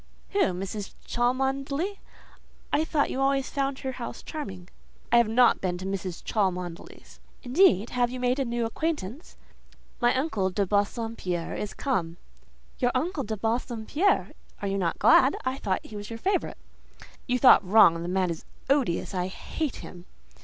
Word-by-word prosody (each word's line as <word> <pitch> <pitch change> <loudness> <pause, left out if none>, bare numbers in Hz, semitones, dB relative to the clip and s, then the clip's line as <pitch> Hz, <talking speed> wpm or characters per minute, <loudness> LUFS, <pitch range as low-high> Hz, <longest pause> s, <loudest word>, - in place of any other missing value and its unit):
"Who? 405 - 0
Mrs. 195 +2 -4
Cholmondeley? 270 +9 -1 0.7
I 310 - +3
thought 310 -2 0
you 265 - -2
always 270 0 +1
found 275 -1 -1
her 265 - -4
house 245 -2 -7
charming?" 190 - -7 0.4
"I 235 - +6
have 235 -2 +5
not 235 +2 +4
been 180 -2 -1
to 185 - -7
Mrs. 190 -2 -4
Cholmondeley's." 180 -5 -3 0.2
"Indeed! 245 - +4
Have 245 -1 +1
you 255 +1 -6
made 250 +2 +1
new 235 0 -1
acquaintance?" 295 - -4 0.6
"My 240 0 +3
uncle 255 -9 0
de 195 +2 0
Bassompierre 205 -3 -1
is 210 - -5
come." 175 -11 -1 0.6
"Your 245 - +3
uncle 315 +3 -1
de 220 -1 -4
Bassompierre! 235 - 0 0.3
Are 200 - -3
you 195 0 -1
not 170 -3 -1
glad?—I 260 +4 +4
thought 190 -3 -2
he 215 - -10
was 205 0 -7
a 230 - -5
favourite." 380 - -1 0.7
"You 250 -1 +2
thought 250 -4 +7
wrong: 185 -4 +6
the 170 - -4
man 185 -1 +1
is 165 - -6 0.3
odious; 255 -11 +1
I 180 -1 -1
hate 290 - -4
him." 175 -1 -11
230 Hz, 155 wpm, -27 LUFS, 190-270 Hz, 0.7 s, thought